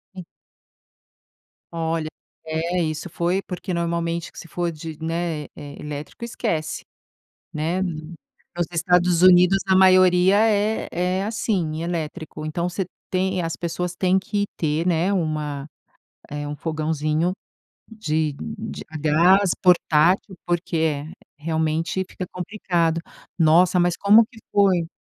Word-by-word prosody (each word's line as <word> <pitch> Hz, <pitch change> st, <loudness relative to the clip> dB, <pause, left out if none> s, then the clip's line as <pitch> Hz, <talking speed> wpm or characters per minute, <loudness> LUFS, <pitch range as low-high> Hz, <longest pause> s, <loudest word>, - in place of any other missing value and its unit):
Hum. 180 Hz, -2 st, -8 dB, 1.5 s
Olha, 165 Hz, -1 st, -2 dB, 0.4 s
é 165 Hz, +3 st, -1 dB
isso 155 Hz, +2 st, -3 dB
foi 175 Hz, +4 st, 0 dB
porque 180 Hz, -1 st, -5 dB
normalmente, 170 Hz, 0 st, -2 dB
que -, -, -11 dB
se -, -, -10 dB
for 175 Hz, +1 st, -2 dB
de, 160 Hz, 0 st, -8 dB
né, 165 Hz, -2 st, -2 dB
eh, 145 Hz, -1 st, -9 dB
elétrico 150 Hz, +8 st, -7 dB
esquece, 160 Hz, -9 st, -3 dB, 0.7 s
né, 165 Hz, +4 st, -1 dB
nos 165 Hz, -2 st, -5 dB, 0.5 s
Estados 175 Hz, 0 st, +2 dB
Unidos 180 Hz, +1 st, +7 dB
a 190 Hz, -1 st, +4 dB
maioria 185 Hz, 0 st, +6 dB
é 210 Hz, +1 st, 0 dB
é, 180 Hz, +2 st, -1 dB
assim, 185 Hz, -7 st, -1 dB
elétrico, 155 Hz, -2 st, -4 dB
então, 170 Hz, +3 st, -2 dB
você 180 Hz, +1 st, -3 dB, 0.2 s
tem 185 Hz, 0 st, 0 dB
as 165 Hz, -1 st, -3 dB
pessoas, 175 Hz, +1 st, -3 dB
têm 185 Hz, +1 st, +2 dB
que 205 Hz, +2 st, -1 dB
ter, 155 Hz, +1 st, 0 dB
né, 175 Hz, +2 st, +2 dB
uma 155 Hz, -5 st, -2 dB, 0.6 s
eh, 145 Hz, 0 st, -4 dB
um 145 Hz, -, -4 dB
fogãozinho 155 Hz, +2 st, -1 dB, 0.6 s
de 160 Hz, -9 st, -1 dB, 0.3 s
de 220 Hz, +1 st, -6 dB
a 160 Hz, -, -7 dB
gás, 175 Hz, +6 st, +4 dB
portátil, 180 Hz, +1 st, +3 dB
porque 175 Hz, 0 st, -1 dB
é 150 Hz, -2 st, 0 dB, 0.3 s
realmente 160 Hz, +3 st, -1 dB
fica 185 Hz, -, -6 dB
complicado, 175 Hz, -3 st, -1 dB, 0.4 s
nossa, 170 Hz, +3 st, +5 dB
mas 175 Hz, -1 st, +2 dB
como 215 Hz, +3 st, +6 dB
que 225 Hz, -, -17 dB
foi, 190 Hz, -4 st, +3 dB
170 Hz, 125 wpm, -23 LUFS, 160-185 Hz, 1.5 s, Unidos